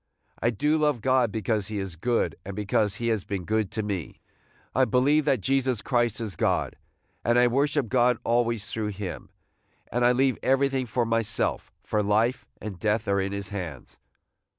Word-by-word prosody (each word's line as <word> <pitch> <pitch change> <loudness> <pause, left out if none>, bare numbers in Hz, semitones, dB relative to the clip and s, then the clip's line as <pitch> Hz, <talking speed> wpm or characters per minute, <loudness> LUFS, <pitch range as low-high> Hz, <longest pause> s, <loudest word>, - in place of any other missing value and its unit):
I 115 - +3
do 150 +8 +1
love 150 -4 +2
God 130 -3 +3
because 110 -1 -1
he 110 -1 -4
is 95 -4 -4
good, 120 +8 0
and 100 0 -7
because 105 0 0
he 115 0 -2
has 110 -4 0
been 95 -3 -4
good 110 -1 0
to 110 - -2
me. 100 -6 -4 0.5
I 130 - +4
believe 140 +4 +3
that 135 -7 +2
Jesus 130 -2 +1
Christ 120 -4 +1
is 110 -6 -3
God, - - 0 0.5
and 120 +2 +3
I 125 - +6
worship 140 +2 +1
God 125 +1 +3
always 115 -3 0
through 110 -1 -2
him, 100 -3 -6 0.6
and 120 0 +1
I 120 - +6
leave 130 +1 +2
everything 135 -1 +1
for 120 +2 0
myself, 115 -1 -1
for 105 - 0
life 110 +5 +1
and 100 -4 -7
death 110 +2 0
are 100 0 +2
in 95 +1 -2
his 100 0 -4
hands. 90 -10 -7
115 Hz, 180 wpm, -26 LUFS, 105-125 Hz, 0.6 s, I